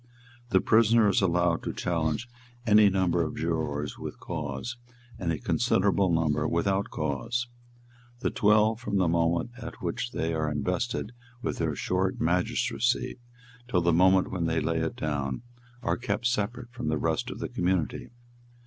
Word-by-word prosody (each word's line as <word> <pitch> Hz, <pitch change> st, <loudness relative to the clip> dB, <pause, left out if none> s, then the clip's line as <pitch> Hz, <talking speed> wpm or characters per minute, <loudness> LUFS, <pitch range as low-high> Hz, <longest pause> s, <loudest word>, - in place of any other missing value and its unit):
The -, -, +4 dB
prisoner 115 Hz, -1 st, +5 dB
is 100 Hz, -, +2 dB
allowed 85 Hz, -2 st, +2 dB
to -, -, -3 dB
challenge 85 Hz, +4 st, -1 dB, 0.4 s
any 105 Hz, -2 st, +6 dB
number 95 Hz, -3 st, +1 dB
of 80 Hz, -, -2 dB
jurors 75 Hz, -3 st, -2 dB
with -, -, -7 dB
cause, 75 Hz, -, -4 dB, 0.4 s
and 85 Hz, -3 st, -1 dB
a 80 Hz, -, -1 dB
considerable 95 Hz, +5 st, +2 dB
number 80 Hz, -2 st, +1 dB
without 95 Hz, +4 st, 0 dB
cause. 75 Hz, -, -2 dB, 0.8 s
The -, -, 0 dB
twelve, 110 Hz, +1 st, +3 dB
from 105 Hz, -4 st, -2 dB
the 95 Hz, -2 st, +3 dB
moment 85 Hz, +5 st, +1 dB
at 120 Hz, -, -8 dB
which 130 Hz, -, -2 dB
they 80 Hz, +1 st, -1 dB
are 80 Hz, -1 st, 0 dB
invested 90 Hz, -, -2 dB, 0.3 s
with -, -, -2 dB
their 80 Hz, -3 st, 0 dB
short 90 Hz, +6 st, -1 dB
magistracy, 115 Hz, +9 st, 0 dB, 0.5 s
till 90 Hz, -8 st, +2 dB
the 85 Hz, 0 st, +3 dB
moment 95 Hz, +2 st, +4 dB
when 85 Hz, -3 st, -1 dB
they 80 Hz, 0 st, +1 dB
lay 80 Hz, 0 st, 0 dB
it 80 Hz, 0 st, -2 dB
down, 70 Hz, -, -2 dB, 0.4 s
are -, -, +1 dB
kept 125 Hz, 0 st, -2 dB
separate 120 Hz, +1 st, -1 dB
from 120 Hz, -, -5 dB
the 75 Hz, 0 st, +1 dB
rest -, -, -1 dB
of -, -, -6 dB
the -, -, -3 dB
community. 90 Hz, -3 st, -1 dB
90 Hz, 160 wpm, -28 LUFS, 80-105 Hz, 0.8 s, any